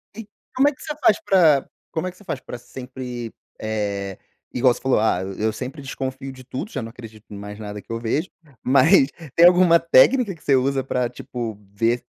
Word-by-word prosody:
E 225 Hz, -2 st, -8 dB, 0.3 s
como 270 Hz, +3 st, +4 dB
é -, -, -4 dB
que -, -, -20 dB
você 300 Hz, -, -4 dB
faz 210 Hz, -, +5 dB
pra 160 Hz, -8 st, +4 dB, 0.3 s
como 165 Hz, +2 st, -2 dB
é -, -, -4 dB
que 180 Hz, -, -23 dB
você 205 Hz, -, -17 dB
faz 160 Hz, -8 st, -4 dB
pra 125 Hz, -, -8 dB
sempre 125 Hz, -1 st, -8 dB, 0.3 s
eh, 100 Hz, -3 st, -3 dB, 0.4 s
igual 125 Hz, 0 st, +4 dB
você -, -, -11 dB
falou: 130 Hz, -4 st, +2 dB
"Ah, 105 Hz, -4 st, +1 dB, 0.2 s
eu 110 Hz, +1 st, 0 dB
sempre 135 Hz, +5 st, -6 dB
desconfio 135 Hz, 0 st, -5 dB
de 130 Hz, -1 st, -13 dB
tudo, 150 Hz, -, -6 dB
já -, -, -3 dB
não 115 Hz, -, -6 dB
acredito 110 Hz, -2 st, -13 dB
em 100 Hz, -, -7 dB
mais 105 Hz, +1 st, -8 dB
nada 105 Hz, -1 st, -7 dB
que -, -, -13 dB
eu 115 Hz, -, -2 dB
vejo". 140 Hz, +10 st, -1 dB, 0.3 s
Mas 135 Hz, +3 st, +5 dB, 0.3 s
tem 170 Hz, -, +7 dB
alguma 175 Hz, -1 st, +6 dB
técnica 200 Hz, -, +4 dB
que 155 Hz, -, -22 dB
você 140 Hz, -, +3 dB
usa 135 Hz, +1 st, +1 dB
pra, 125 Hz, -2 st, -1 dB
tipo, 120 Hz, -3 st, -6 dB, 0.2 s
ver 115 Hz, +3 st, 0 dB
130 Hz, 210 wpm, -22 LUFS, 115-160 Hz, 0.4 s, tem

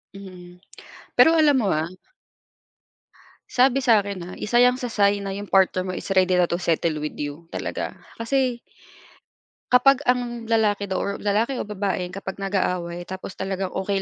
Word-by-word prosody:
Mm. 180 Hz, -2 st, -12 dB, 0.6 s
Pero, 325 Hz, -, +7 dB
alam 295 Hz, -4 st, +4 dB
mo, 215 Hz, -, +1 dB
ah 160 Hz, +2 st, -2 dB, 1.6 s
sabi 260 Hz, +1 st, +3 dB
sa'kin 205 Hz, -5 st, +2 dB
ha, 180 Hz, -, -8 dB
isa 240 Hz, +3 st, 0 dB
'yan 250 Hz, +1 st, +4 dB
sa 250 Hz, -, -3 dB
sign 200 Hz, -2 st, +1 dB
na 195 Hz, 0 st, -4 dB
'yung 205 Hz, 0 st, -7 dB
partner 190 Hz, -1 st, +3 dB
mo 185 Hz, -, -3 dB
is -, -, -7 dB
ready 185 Hz, -1 st, +4 dB
na 175 Hz, -, +3 dB
to 170 Hz, -, -2 dB
settle 165 Hz, -2 st, 0 dB
with 150 Hz, -, -4 dB
you, 150 Hz, +3 st, -6 dB
talaga. -, -, -4 dB, 0.2 s
Kasi 250 Hz, 0 st, -1 dB, 1.1 s
kapag 275 Hz, +3 st, +5 dB
ang 245 Hz, -2 st, -1 dB
lalaki 205 Hz, -3 st, +1 dB
daw, 190 Hz, -, -1 dB
or 200 Hz, -, -2 dB
lalaki 215 Hz, +6 st, 0 dB
o -, -, -1 dB
babae, 195 Hz, -3 st, -2 dB
kapag 195 Hz, 0 st, -7 dB
nag-aaway, 180 Hz, -3 st, -2 dB
tapos 190 Hz, 0 st, -7 dB
talagang 190 Hz, -1 st, -3 dB
okey 195 Hz, +1 st, -1 dB
200 Hz, 165 wpm, -23 LUFS, 185-235 Hz, 1.6 s, Pero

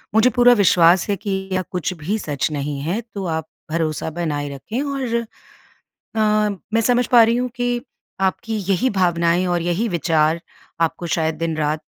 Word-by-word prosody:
मुझे 220 Hz, +3 st, +6 dB
पूरा 245 Hz, +1 st, +5 dB
विश्वास 180 Hz, -4 st, +4 dB
है 200 Hz, -, +2 dB
कि 195 Hz, -1 st, -4 dB
या 185 Hz, -, +1 dB
कुछ 180 Hz, 0 st, -2 dB
भी 175 Hz, +6 st, -3 dB
सच 145 Hz, -8 st, -1 dB
नहीं 145 Hz, -1 st, -3 dB
है। 175 Hz, +9 st, -1 dB
तो 195 Hz, -2 st, -4 dB
आप 160 Hz, -2 st, -2 dB, 0.2 s
भरोसा 160 Hz, -1 st, -1 dB
बनाए 150 Hz, -3 st, -3 dB
रखें 175 Hz, -, -4 dB
और 270 Hz, -4 st, -2 dB, 0.8 s
अ, 210 Hz, -2 st, 0 dB, 0.2 s
मैं 225 Hz, -, +4 dB
समझ 245 Hz, +1 st, +2 dB
पा 240 Hz, -2 st, +7 dB
रही 230 Hz, +1 st, +3 dB
हूँ 250 Hz, +1 st, 0 dB
कि 245 Hz, 0 st, 0 dB, 0.4 s
आपकी 220 Hz, +4 st, -1 dB
यही 240 Hz, +7 st, +2 dB
भावनाएँ 175 Hz, -2 st, +2 dB
और 175 Hz, -1 st, 0 dB
यही 175 Hz, +7 st, 0 dB
विचार 165 Hz, -2 st, +1 dB, 0.4 s
आपको 165 Hz, +1 st, 0 dB
शायद 160 Hz, -1 st, 0 dB
दिन-रात 155 Hz, -2 st, -1 dB
180 Hz, 165 wpm, -21 LUFS, 160-220 Hz, 0.8 s, पा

